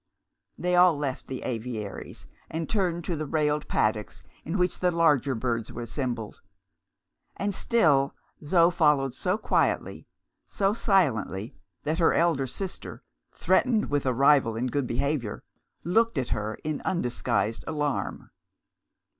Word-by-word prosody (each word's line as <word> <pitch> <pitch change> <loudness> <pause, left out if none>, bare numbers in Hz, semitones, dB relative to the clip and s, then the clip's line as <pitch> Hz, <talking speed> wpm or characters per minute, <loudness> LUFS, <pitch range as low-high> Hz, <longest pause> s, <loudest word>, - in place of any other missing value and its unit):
They 180 0 0
all 180 -3 +6
left 140 -1 -4
the 130 - -5
aviaries, 115 -4 -5 0.2
and 160 0 -3
turned 180 -5 0
to 170 - -2
the 155 -1 -4
railed 150 0 0
paddocks 105 0 -1 0.2
in 165 +6 -3
which 180 -1 0
the 180 - +2
larger 150 -6 +2
birds 115 -1 -2
were 120 - -6
assembled. 120 -3 -4 1.0
And 200 +1 -1
still 150 -11 +2 0.3
Zo 170 +3 +4
followed 150 -6 +2
so 180 +9 -1
quietly, - - 0 0.4
so 195 0 +1
silently, 130 - +1 0.3
that 155 +3 -1
her 165 - +4
elder 165 -6 +2
sister 185 +9 -6 0.3
threatened 230 - +2
with 145 -2 0
a 130 - +2
rival 135 -3 +4
in 115 +3 -1
good 130 0 -1
behaviour 130 -3 -2 0.4
looked 225 +2 +2
at 130 -3 -1
her 110 0 -2
in 155 -1 -3
undisguised 120 - -1
alarm. 150 -3 -3
145 Hz, 135 wpm, -27 LUFS, 125-175 Hz, 1.0 s, all